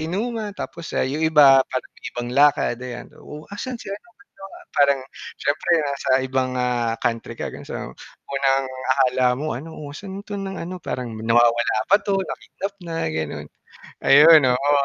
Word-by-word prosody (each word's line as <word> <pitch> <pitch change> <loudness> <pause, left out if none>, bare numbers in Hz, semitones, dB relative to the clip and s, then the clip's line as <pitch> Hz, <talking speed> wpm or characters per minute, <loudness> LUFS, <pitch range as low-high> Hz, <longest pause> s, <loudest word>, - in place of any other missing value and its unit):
inuman. 210 +5 -3
Tapos, 170 - -7
ah, - - +2
yung 140 +4 -3
iba, 145 -4 +6
parang 130 - -4
may - - -23
ibang 120 0 -3
lakad, 145 -3 +3
ayan, 125 -1 -7
"Oh, 150 +1 -10
asan 250 +5 -5
si 195 - -9
ano, 200 - -5
ba't 235 -1 -26 0.4
nawa" - - -12 0.2
parang 140 -1 +4 0.4
siyempre 145 +4 -1 0.2
nasa 140 -1 -4 0.2
ibang, 130 0 -1
ah, 120 -2 0
country 115 -1 -2
ka, - - -2
ganon. - - -9
So - - -6 0.6
unang 135 0 +2 0.3
akala 130 -1 +2
mo 155 -1 -2
ano, 155 +6 -8
"Oh, 145 -1 -8
san 195 -1 -7
'to 205 - -6
ng 195 -1 -5
ano?" 180 +1 -6
parang, 120 -3 -4
"Nawawala 120 +1 +2
ba 200 - +6
'to, 200 -1 0
na-kidnap 195 +1 -6
na." 170 -1 -6
ganon. 80 -1 -4 0.5
Ayun, 155 +3 +8
oo. 140 +4 +1
145 Hz, 175 wpm, -22 LUFS, 125-175 Hz, 0.6 s, Ayun